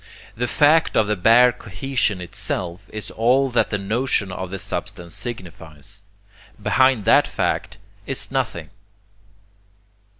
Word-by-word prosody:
The 120 +2 -2
fact 155 +5 +3
of 110 - +4
the 105 +1 0
bare 115 +6 +6
cohesion 110 -2 -2
itself 90 0 -4
is 105 -2 -6
all 130 +4 +2
that 120 - +2
the 105 - -1
notion 100 0 -1
of 95 0 -5
the 95 - -5
substance 90 -1 -5
signifies. 95 - -8 0.6
Behind 130 0 +2
that - - +5
fact 105 - -2 0.3
is 135 - -3
nothing. 110 - -3
105 Hz, 125 wpm, -21 LUFS, 95-125 Hz, 0.6 s, bare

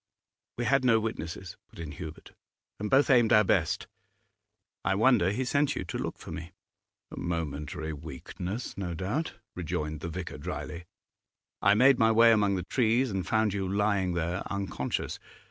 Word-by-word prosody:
'We 120 - -1
had 135 0 +3
no 115 -3 +5
witnesses,' 90 -5 -5
put - - -18
in 80 -2 -6
Hubert; 80 +1 -9 0.5
'and 105 +1 -2
both 135 +1 +4
aimed 120 -4 +5
our 105 - +7
best. - - +1 1.0
I 95 - +2
wonder 110 -3 +4
he 125 +6 -1
sent 145 +2 +1
you - - -2
to - - -4
look - - -3
for - - -10
me.' 85 +2 -7 0.6
'A - - -7
momentary 80 -1 -3
weakness, 80 - -6
no 90 -4 -4
doubt,' 105 - -2 0.2
rejoined 75 -3 -3
the 85 - -5
vicar 90 +1 -6
drily. 85 +1 -5 0.8
I 100 +1 +5
made 130 +3 +6
my 115 -1 +5
way 115 +1 +7
among 105 -3 +3
the 90 - -2
trees 120 +2 +2
and 95 -3 -2
found 110 -2 +2
you 95 -2 -2
lying 100 -3 +1
there, 85 +2 -1
unconscious. 100 -9 -3
100 Hz, 165 wpm, -29 LUFS, 85-115 Hz, 1.0 s, our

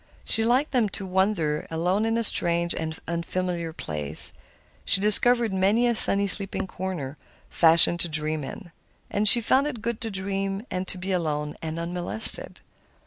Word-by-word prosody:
She 225 - +2
liked 255 +6 -1
then 240 -6 -1
to 195 - -8
wander 185 -5 -3
alone 180 +6 -2
into 230 +1 -2
strange 170 -4 +3
and 160 -1 -7
unfamiliar 170 0 -5
places. 75 - -4 0.5
She 195 - +2
discovered 225 +2 +4
many 200 +6 0
a 240 - 0
sunny, 200 -2 +9
sleepy 195 0 -2
corner, 175 -7 -8 0.3
fashioned 170 +1 +3
to 170 - +1
dream 155 -1 -3
in. 175 +5 -11 0.4
And 210 +1 0
she 235 +4 +8
found 265 +5 0
it 255 -6 -7
good 235 -1 -5
to 225 - -5
dream 195 0 -5
and 185 0 -5
to - - -5
be 190 +2 -7
alone 150 -4 -4
and 160 0 -7
unmolested. 175 +5 -2
190 Hz, 160 wpm, -23 LUFS, 165-215 Hz, 0.5 s, sunny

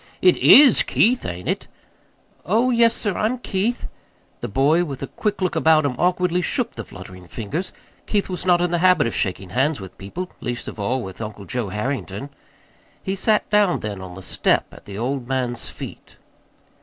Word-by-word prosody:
"It 180 -1 +5
IS 275 -4 +8
Keith 245 +3 +2
ain't 90 +1 -6
it?" - - -2 0.8
"Oh, 230 +8 +2
yes, 230 -1 +4
sir, 205 -4 -2
I'm 225 +4 0
Keith." 230 +1 -2 0.5
The - - -4
boy, 145 - +3
with 140 -5 -6
a 135 - -7
quick 210 -3 -2
look 180 - 0
about 155 -1 +4
him, 140 - 0
awkwardly 180 0 +2
shook 245 +6 -1
the 115 - -7
fluttering 95 -2 -12
fingers 125 - -4 0.4
Keith 205 -2 0
was 180 -2 -4
not 175 -1 +3
in 175 -1 +1
the 175 - +1
habit 180 -4 +4
of 115 - -2
shaking 95 -1 -2
hands 135 +4 +1
with 95 -2 -10
people, 175 - -6
least 120 0 -4
of - - -7
all 125 +6 -1
with 95 +2 -8
Uncle 105 -2 -7
Joe 115 +1 -3
Harrington. 125 +3 -4 0.7
He 190 - -2
sat 210 +2 +1
down 205 -3 +3
then 100 -2 -5
on 90 -1 -9
the 95 - -9
step - - 0
at - - -14
the 100 -1 -8
old 125 +2 -2
man's 125 -3 -2
feet. - - -10
145 Hz, 190 wpm, -22 LUFS, -, 0.8 s, IS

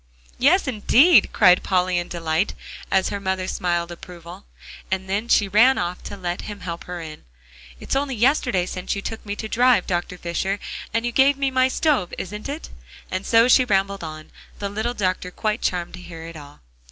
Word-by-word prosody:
"Yes, 305 +7 +4
indeed," 260 - +5
cried 180 -3 +5
Polly 180 -1 +1
in 175 - -5
delight, 165 +2 -1 0.3
as 190 -1 +2
her 200 - -3
mother 190 -1 -2
smiled 175 -2 -1
approval, 175 +1 -11 0.4
and 190 +4 -2
she 205 - +4
ran 235 +7 +5
off 175 +1 -3
to 200 - -7
let 175 -2 -4
him 205 -2 -8
help 170 -1 -6
her 180 -1 -6
in. 155 -1 -9 0.6
"It's - - -3
only 275 -1 -1
yesterday 240 -6 +2
since 185 +1 -4
you 200 - -5
took 225 - -5
me 205 -1 -4
to 220 - -5
drive, 240 -3 +3
Dr. 175 0 -2
Fisher, 185 +3 -2 0.3
and 230 +2 -1
you 240 - -1
gave 275 +3 +4
me 275 -1 0
my 260 0 +3
stove 260 - 0
is 190 - -6
it?" 280 +9 -6 0.4
And 185 +1 -3
so 230 +1 +5
she 255 +1 +6
rambled 200 -4 0
on, 155 -1 -8 0.3
the 200 - -4
little 220 +4 -3
doctor 185 -3 -1
quite 215 +4 -2
charmed 175 -1 -2
to 180 - -9
hear 165 -2 -9
it 165 0 -9
all. 145 - -12
195 Hz, 190 wpm, -22 LUFS, 180-235 Hz, 0.6 s, she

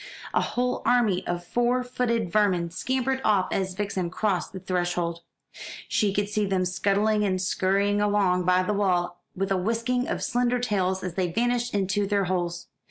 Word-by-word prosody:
A - - +3
whole 250 +1 -1
army 220 -7 +2
of 175 0 -3
four 245 +5 +1
footed 235 -6 -1
vermin 185 -5 +2
scampered 260 +7 -1
off 195 -3 +2
as 190 -1 -1
Vixen 190 -3 -2
crossed 185 0 -1
the 190 - -7
threshold. 175 -2 -1 0.7
She 205 -2 +1
could 205 +1 0
see 210 0 -1
them 190 -1 +1
scuttling 205 +4 +1
and 185 -2 0
scurrying 200 +2 +1
along 200 -3 +2
by 180 0 +3
the 210 - -1
wall, 180 -3 0
with 195 +1 -2
a 195 - +3
whisking 230 +6 0
of - - -2
slender 245 0 +1
tails 190 -6 0
as 180 -2 -4
they 180 -1 -1
vanished 240 +3 0
into 200 +1 0
their 200 -1 +1
holes. 175 -1 -2
195 Hz, 170 wpm, -26 LUFS, 180-220 Hz, 0.7 s, A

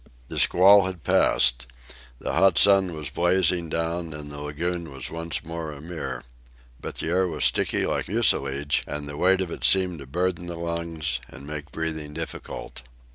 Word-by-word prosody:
The - - -2
squall 100 +2 +6
had 90 -4 -7
passed. - - +3 0.5
The - - -4
hot 95 -3 +4
sun 95 -4 +5
was 75 -3 -5
blazing 90 0 +1
down, 80 -1 -2
and 75 -1 -7
the 75 - -8
lagoon 80 +3 -4
was 65 - -5
once 85 0 -2
more 80 -1 -5
a 75 - -10
mirror. 70 -6 -6 0.6
But - - -7
the - - -3
air 90 +2 +2
was 80 -3 -3
sticky - - +2
like - - -1
mucilage, 75 - +1
and 75 0 -4
the 75 - -5
weight 95 +4 +3
of 90 -3 -3
it - - -7
seemed 90 -3 +3
to 70 - -10
burden 90 +3 -1
the 85 - -5
lungs 85 -4 -2
and 70 - -11
make 75 +1 -7
breathing 80 -2 -4
difficult. 80 -5 -7
80 Hz, 180 wpm, -25 LUFS, 75-90 Hz, 0.6 s, squall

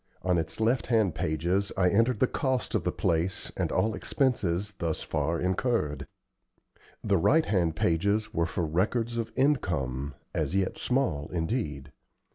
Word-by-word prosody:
On 90 -2 +2
its 80 +5 -4
left 115 +3 +1
hand 110 -7 +2
pages 85 +6 0
I 90 -1 +4
entered 115 +2 +2
the - - +5
cost 130 -1 -1
of - - 0
the - - +1
place 85 +3 -1
and - - -1
all 110 0 +1
expenses 105 -4 0
thus 80 -2 -2
far 85 +1 -1
incurred. 90 - 0 1.0
The 100 -2 +2
right 160 - +4
hand 85 -5 +1
pages 100 +7 +1
were 85 -3 +1
for 85 - -2
records 110 +9 0
of 115 -1 -2
income, 70 - 0 0.2
as - - -1
yet 95 -1 0
small 120 - 0
indeed. 80 - -2
95 Hz, 150 wpm, -28 LUFS, 80-115 Hz, 1.0 s, the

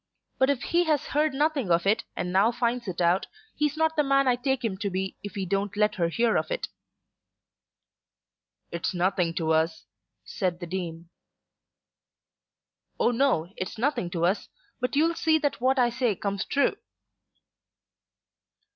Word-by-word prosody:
But 265 - +4
if 280 -3 0
he 345 +1 +2
has 305 -2 +1
heard 300 +1 +1
nothing 285 - 0
of 170 +1 +3
it 210 +3 +2
and 180 0 -3
now 200 +5 +4
finds 240 -1 -1
it 180 -2 -4
out, 175 +2 +2 0.3
he's 300 0 0
not 320 0 +1
the 300 - +4
man 275 -1 +3
I 250 - +4
take 260 0 -1
him 205 -4 -1
to 205 -1 -1
be 190 0 -3
if 205 -2 -8
he 195 -2 -2
don't 200 +2 -2
let 210 0 +3
her 170 -3 0
hear 230 +6 +2
of - - -1
it." - - -3 2.0
"It's 170 +3 -2
nothing 180 -2 +1
to 160 -1 0
us," 160 0 +1 0.4
said 180 -2 -2
the 175 - -5
Dean. 170 -2 -5 1.9
"Oh, - - +3
no; 230 - +1
it's 185 - -5
nothing 240 -7 0
to 170 -1 0
us. 190 +4 0 0.3
But 250 +2 -2
you'll 325 +3 +3
see 320 -1 +2
that 290 -5 -1
what 260 +2 +3
I 245 -2 +3
say 240 -3 0
comes 200 0 -3
true." 280 - +1
220 Hz, 165 wpm, -27 LUFS, 180-275 Hz, 2.0 s, But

